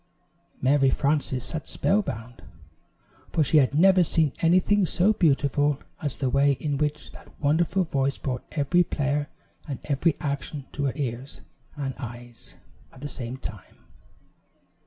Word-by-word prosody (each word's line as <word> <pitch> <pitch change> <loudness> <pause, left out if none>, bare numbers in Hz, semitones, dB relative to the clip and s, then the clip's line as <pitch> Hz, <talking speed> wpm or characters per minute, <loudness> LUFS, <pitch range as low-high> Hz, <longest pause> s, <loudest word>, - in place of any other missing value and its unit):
Mary 135 +1 +3
Frances 140 -3 0
sat 155 +3 -5
spellbound, 125 - -1 0.9
for 160 - +2
she 155 - +3
had 140 -1 +3
never 185 +3 +6
seen 160 -3 +2
anything 185 +4 +3
so 185 +4 +4
beautiful 145 -5 +2 0.2
as 145 -3 -2
the 135 - -1
way 140 +2 +3
in 140 0 -3
which 150 0 -2
that - - -15
wonderful 170 +6 +2
voice 140 -4 -1
brought 125 -2 -4
every 155 +4 +3
player 145 -2 -1 0.4
and 140 -4 -4
every 145 +2 +1
action 140 0 -4
to 140 - -2
her 135 - 0
ears 130 -1 -5 0.3
and 135 -2 -3
eyes 120 -1 -9 0.3
at 130 - -16
the 145 - -4
same 130 -3 -3
time. 105 -7 -9
145 Hz, 140 wpm, -26 LUFS, 135-160 Hz, 0.9 s, never